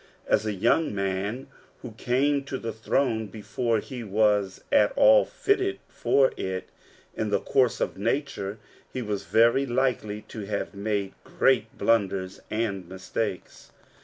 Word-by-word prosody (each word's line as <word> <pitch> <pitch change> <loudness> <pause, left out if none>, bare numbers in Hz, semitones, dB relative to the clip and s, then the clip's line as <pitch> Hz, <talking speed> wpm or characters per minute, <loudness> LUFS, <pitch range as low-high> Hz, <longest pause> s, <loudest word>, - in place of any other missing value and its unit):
As 105 - +1
a - - +1
young 115 - +2
man 100 +5 -2 0.4
who 125 - -7
came 135 +6 +1
to 140 - -5
a - - -1
throne 110 0 0
before 115 +3 -1
he 125 +2 -6
was 105 -2 +1
at 285 - +5
all - - +7
fitted 390 -5 0
for 135 -1 +2
it 95 -1 -4 0.5
in 110 - -2
the 100 -1 +2
course 125 +3 +2
of - - -2
nature, 105 -4 -2 0.3
he 130 - -4
was 105 -4 -3
very 115 +8 +4
likely 120 -4 -1
to 110 -3 -8
have 100 -1 -3
made 100 -1 -2
great 125 -4 +1
blunders 95 -4 +1
and 100 -5 -2
mistakes. 95 +1 -5
110 Hz, 140 wpm, -26 LUFS, 100-130 Hz, 0.5 s, all